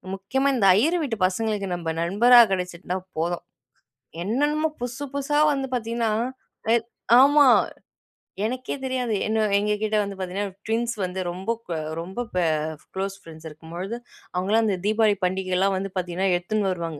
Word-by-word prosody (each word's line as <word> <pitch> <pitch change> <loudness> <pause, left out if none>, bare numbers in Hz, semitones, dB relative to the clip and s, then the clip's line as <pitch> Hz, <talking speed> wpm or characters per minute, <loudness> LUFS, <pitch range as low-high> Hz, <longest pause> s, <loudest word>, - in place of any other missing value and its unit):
முக்கியமா 260 +9 -1
இந்த 225 -6 +2
ஐயர் 320 +11 +3
வீட்டு 240 -6 -2
பசங்களுக்கு 205 +1 -2
நம்ம 170 -2 -4
நண்பரா 225 +8 +6
கிடைச்சிருந்தா 180 0 -2 0.2
போதும். 170 +2 -1 0.8
என்னென்னமோ 295 - +1
புதுசு, 245 +4 -4
புதுசா 280 +1 0 0.2
வந்து 270 -1 -2
பார்த்தீங்கன்னா, 230 -1 -1 0.6
எ - - +6 0.5
ஆமா. 290 +1 +6 1.0
எனக்கே 255 +2 -3
தெரியாது. 255 -3 -1
என்ன 220 0 +1
எங்கக்கிட்ட 210 +1 0
வந்து 200 -1 -5
பார்த்தீங்கன்னா, 190 +1 -3
ட்வின்ஸ் 230 +1 0
வந்து 185 +1 -3
ரொம்ப, 185 +5 -3 0.2
க - - -7 0.3
ரொம்ப 190 +7 -6 0.2
ப - - 0 0.6
க்ளோஸ் 195 +1 -2
ஃப்ரெண்ட்ஸ் 160 -1 -13
இருக்கும்பொழுது, 170 +8 -7 0.4
அவுங்களாம் 205 +5 +2
அந்த 205 -3 +1
தீபாவளி 215 -1 +3
பண்டிகையிலாம் 190 +1 0
வந்து 195 +1 -3
பார்த்தீங்கன்னா, 185 +1 -1
எடுத்துன்னு 200 +3 -1
வருவாங்க. 165 -4 -4
205 Hz, 140 wpm, -24 LUFS, 185-235 Hz, 1.0 s, நண்பரா